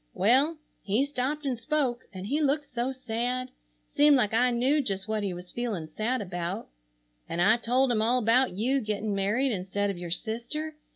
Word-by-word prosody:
Well, 260 - +3 0.2
he 215 +7 +1
stopped 285 +2 -2
and 265 -2 0
spoke, 260 -2 -1
and 190 -2 -7
he 290 +9 0
looked 290 +1 +1
so 250 0 -2
sad, 255 0 -2 0.4
seemed 290 0 +5
like 220 -5 +2
I 245 +3 +4
knew 255 +5 +2
just 195 -5 -3
what 215 -1 -1
he 200 -2 -1
was 180 0 -8
feeling 225 -9 -3
sad 215 +9 -2
about, 175 - -4 0.6
and 170 - -3
I 210 +6 +5
told 250 +3 +2
him 220 -2 +1
all 235 +3 +3
about 250 +2 +3
you 250 +8 0
getting 210 -1 -2
married 210 +7 +1
instead 200 0 -1
of 185 - -7
your 175 -1 -5
sister. 240 - -3
235 Hz, 185 wpm, -28 LUFS, 205-265 Hz, 0.6 s, seemed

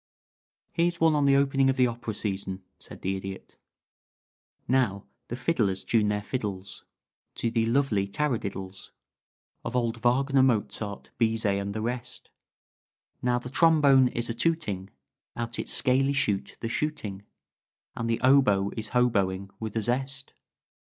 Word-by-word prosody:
"Here's 170 0 0
one 160 -1 +4
on 145 -1 +2
the 140 0 +5
opening 135 -1 +3
of 135 - +2
the 130 -1 +4
opera 115 -2 -4
season," 95 -2 -3 0.2
said - - -8
the 95 +1 0
Idiot: 95 0 -8 1.1
"Now 120 -6 +1 0.2
the 120 - -4
fiddlers 115 - 0
tune 110 -3 +2
their 105 0 -1
fiddles 100 -5 -4 0.5
To 115 - -1
the 115 -1 +1
lovely 115 -6 +1
taradiddles 100 -6 -3 0.7
Of - - -4
old 120 -2 0
Wagner, 135 +3 +3
Mozart, 110 -4 -1
Bizet, 110 -3 +2
and 100 +1 -4
the 110 - -2
rest. 125 +1 -5 0.9
Now 125 0 +2
the 125 +1 -6
trombone 145 -4 +5
is 120 -1 -2
a 115 - -2
tooting 115 - -1 0.5
Out 115 -1 -4
its - - -2
scaley 135 +2 +3
shute 100 -6 -1
the 115 - -2
chuteing 115 -7 -3 0.7
And 115 - -3
the 115 - +1
oboe 125 -7 +4
is 110 -1 -1
hoboing 100 -6 +1
with 110 -1 -5
a 110 - 0
zest. 135 +4 -2
115 Hz, 145 wpm, -27 LUFS, 100-135 Hz, 1.1 s, the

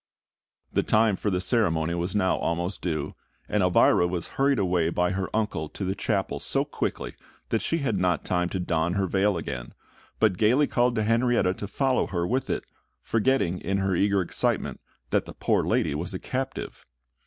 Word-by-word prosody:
The - - +3
time 110 -1 +3
for 105 - -2
the 90 -2 0
ceremony 85 -6 +1
was 85 +3 -2
now 95 -2 +2
almost 85 +3 -2
due; 80 -4 -2 0.3
and 105 - +1
Elvira 90 -1 +4
was 90 -1 -4
hurried 140 0 +2
away 90 -4 +1
by 90 +1 +1
her 95 0 -2
uncle 105 -8 -1
to 100 - -5
the 95 - 0
chapel 100 -1 -1
so - - 0
quickly - - -3 0.4
that - - +1
she 165 - 0
had 110 -6 +1
not 90 -3 +1
time 90 -1 0
to 95 - -3
don 85 -1 0
her 100 0 +1
veil 95 +1 +1
again, 60 -7 -6 0.4
but 105 -5 +2
gaily 125 +7 +4
called 120 -2 +1
to 110 - +1
Henrietta 115 -3 +2
to 100 - -6
follow 130 +4 +1
her 85 -3 -1
with 130 +7 -1
it, - - -2 0.4
forgetting 115 -6 +1
in 100 +3 -1
her 95 -1 0
eager 100 +1 +2
excitement 85 - -1 0.3
that - - +2
the - - -9
poor - - +1
lady 75 - +1
was 85 +6 -4
a - - -3
captive. 135 +1 -5
95 Hz, 190 wpm, -26 LUFS, 90-110 Hz, 0.4 s, Elvira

